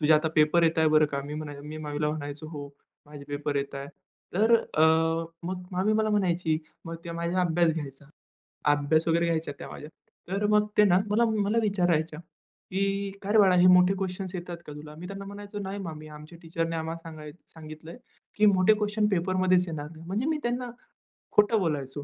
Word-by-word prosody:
"तुझे 155 Hz, +1 st, +4 dB
आता 155 Hz, +1 st, +4 dB
पेपर 155 Hz, +2 st, +4 dB
येताय 160 Hz, -1 st, +3 dB
बरं 155 Hz, 0 st, +5 dB
का." 140 Hz, -, -1 dB
मी 150 Hz, +1 st, -6 dB
म्हणाय 150 Hz, -2 st, -6 dB
मी 150 Hz, +1 st, -7 dB
मामीला 150 Hz, -1 st, -2 dB
म्हणायचो, 145 Hz, 0 st, -6 dB
"हो 145 Hz, -3 st, -7 dB, 0.4 s
माझे 145 Hz, -1 st, -11 dB
पेपर 145 Hz, 0 st, -2 dB
येताय." 140 Hz, 0 st, -3 dB, 0.5 s
तर 220 Hz, +4 st, +4 dB, 0.2 s
अ, 155 Hz, -, +3 dB, 0.6 s
मग 180 Hz, +1 st, -4 dB
मामी 190 Hz, +4 st, +1 dB
मला 215 Hz, 0 st, +1 dB
म्हणायची, 175 Hz, -6 st, +1 dB, 0.3 s
मग 165 Hz, 0 st, -6 dB
ते 170 Hz, -, -6 dB
माझ्या 170 Hz, +2 st, -1 dB
अभ्यास 170 Hz, -1 st, +3 dB
घ्यायचा. 145 Hz, -3 st, -7 dB, 0.7 s
अभ्यास 145 Hz, +3 st, +2 dB
वगैरे 165 Hz, +1 st, +3 dB
घ्यायचा 165 Hz, -2 st, -1 dB
त्या -, -, -7 dB
माझ्या. 150 Hz, -, -9 dB, 0.4 s
तर 200 Hz, +2 st, -1 dB
मग 210 Hz, 0 st, +3 dB
ते 210 Hz, -, +7 dB
ना 180 Hz, -3 st, +5 dB
मला 225 Hz, +3 st, +3 dB
मला 215 Hz, -1 st, 0 dB
विचारायच्या, 175 Hz, -7 st, 0 dB
की 195 Hz, +4 st, -4 dB
"काय 200 Hz, +1 st, -3 dB
रे 220 Hz, -, +6 dB
बाळा, 190 Hz, -3 st, +6 dB
हे 180 Hz, 0 st, +6 dB
मोठे 180 Hz, +1 st, +6 dB
क्वेशन्स 190 Hz, 0 st, -4 dB
येतात 175 Hz, -1 st, -6 dB
का 150 Hz, -, -7 dB
तुला?" 150 Hz, +1 st, -10 dB
मी 180 Hz, -, -7 dB
त्यांना 195 Hz, 0 st, -7 dB
म्हणायचो, 205 Hz, +1 st, -8 dB
"नाही 195 Hz, 0 st, -4 dB
म 170 Hz, -5 st, -5 dB
मी 155 Hz, 0 st, -10 dB
आमच्या 155 Hz, +2 st, -12 dB
टीचरने 165 Hz, 0 st, -3 dB
आम्हाला 160 Hz, +1 st, -3 dB
सांगाय 155 Hz, -2 st, -9 dB, 0.2 s
सांगितलं 155 Hz, +2 st, -10 dB, 0.4 s
की 210 Hz, -, +4 dB
मोठे 195 Hz, +1 st, +5 dB
क्वेशन 210 Hz, 0 st, 0 dB
पेपर 185 Hz, -2 st, 0 dB
मध्येच 185 Hz, -1 st, +3 dB
येणार 150 Hz, -3 st, -5 dB
नाही." 160 Hz, 0 st, -12 dB
म्हणजे 205 Hz, +7 st, -1 dB
मी 315 Hz, -, +1 dB
त्यांना 245 Hz, +1 st, -2 dB, 0.6 s
खोटं 210 Hz, +1 st, +4 dB
बोलायचो. 145 Hz, -5 st, -2 dB
170 Hz, 195 wpm, -27 LUFS, 155-195 Hz, 0.7 s, ते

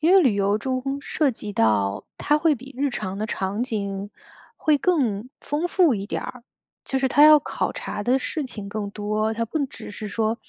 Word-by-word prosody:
因 325 Hz, +4 st, +4 dB
为 385 Hz, -, +8 dB
旅 260 Hz, -, +3 dB
游 200 Hz, +1 st, +2 dB
中， 255 Hz, +2 st, -2 dB, 0.2 s
涉 295 Hz, 0 st, +1 dB
及 210 Hz, -3 st, -6 dB
到 105 Hz, -, +1 dB
它 295 Hz, -, +3 dB
会 305 Hz, 0 st, +3 dB
比 270 Hz, +2 st, -12 dB
日 280 Hz, +1 st, +1 dB
常 195 Hz, -6 st, -4 dB
的 210 Hz, -, -2 dB
场 200 Hz, 0 st, -2 dB
景 200 Hz, -4 st, -3 dB, 0.5 s
会 305 Hz, -1 st, +3 dB
更 255 Hz, -, +1 dB
丰 305 Hz, +4 st, -2 dB
富 350 Hz, -7 st, +4 dB
一 195 Hz, -2 st, -3 dB
点 205 Hz, -, -3 dB
儿， 255 Hz, -1 st, -8 dB, 0.4 s
就 270 Hz, -, -1 dB
是 265 Hz, -, +1 dB
它 280 Hz, +2 st, +4 dB
要 305 Hz, 0 st, +9 dB
考 295 Hz, -, -2 dB
察 205 Hz, -, -5 dB
的 250 Hz, +5 st, +3 dB
事 305 Hz, +3 st, -3 dB
情 210 Hz, -5 st, -7 dB
更 205 Hz, 0 st, -4 dB
多， 215 Hz, +1 st, -1 dB
它 230 Hz, +1 st, -1 dB
不 285 Hz, +6 st, -1 dB
只 -, -, -10 dB
是 210 Hz, +1 st, -6 dB
说 220 Hz, +3 st, 0 dB
230 Hz, 225 characters per minute, -24 LUFS, 205-285 Hz, 0.5 s, 要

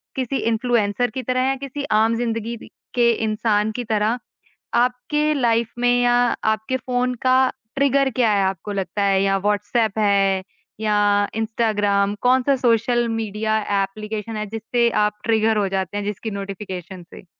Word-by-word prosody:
किसी 265 Hz, 0 st, -2 dB
इन्फ्लुएंसर 230 Hz, 0 st, +1 dB
की 260 Hz, +4 st, -5 dB
तरह 255 Hz, +2 st, 0 dB
या 270 Hz, -, +1 dB
किसी 275 Hz, +1 st, -6 dB
आम 225 Hz, +1 st, +3 dB
ज़िंदगी 230 Hz, 0 st, -2 dB
दि -, -, -13 dB, 0.3 s
के 235 Hz, -1 st, +4 dB
इंसान 215 Hz, 0 st, +1 dB
की 245 Hz, +3 st, -4 dB
तरह? 220 Hz, +1 st, 0 dB, 0.6 s
आपके 255 Hz, +5 st, +1 dB
लाइफ 235 Hz, -4 st, +1 dB
में 245 Hz, 0 st, +3 dB
या 245 Hz, 0 st, +3 dB, 0.4 s
आपके 220 Hz, +4 st, -2 dB
फ़ोन 250 Hz, 0 st, -1 dB
का 255 Hz, 0 st, +5 dB, 0.4 s
ट्रिगर 275 Hz, 0 st, +3 dB
क्या 240 Hz, -4 st, +3 dB
है 200 Hz, -1 st, +2 dB
आपको 190 Hz, +2 st, -3 dB
लगता 200 Hz, +1 st, -2 dB
है? 195 Hz, -1 st, +3 dB
या 195 Hz, 0 st, +2 dB
व्हाट्सएप 210 Hz, +2 st, 0 dB
है 195 Hz, -2 st, +2 dB, 0.4 s
या 205 Hz, -1 st, +2 dB
इंस्टाग्राम? 210 Hz, -3 st, 0 dB
कौन-सा 260 Hz, +2 st, +3 dB
सोशल 240 Hz, 0 st, +2 dB
मीडिया 220 Hz, -1 st, -1 dB, 0.2 s
एप्लीकेशन 215 Hz, +2 st, -5 dB
है, 215 Hz, -, -3 dB
जिससे 225 Hz, +3 st, 0 dB, 0.2 s
आप 210 Hz, 0 st, -2 dB
ट्रिगर 220 Hz, -1 st, +2 dB
हो 200 Hz, -2 st, +1 dB
जाते 190 Hz, 0 st, -3 dB
हैं 205 Hz, -, -2 dB
जिसकी 210 Hz, +2 st, -4 dB
नोटिफ़िकेशन 190 Hz, -2 st, -6 dB
से? 175 Hz, +2 st, -14 dB
220 Hz, 155 wpm, -21 LUFS, 205-245 Hz, 0.6 s, का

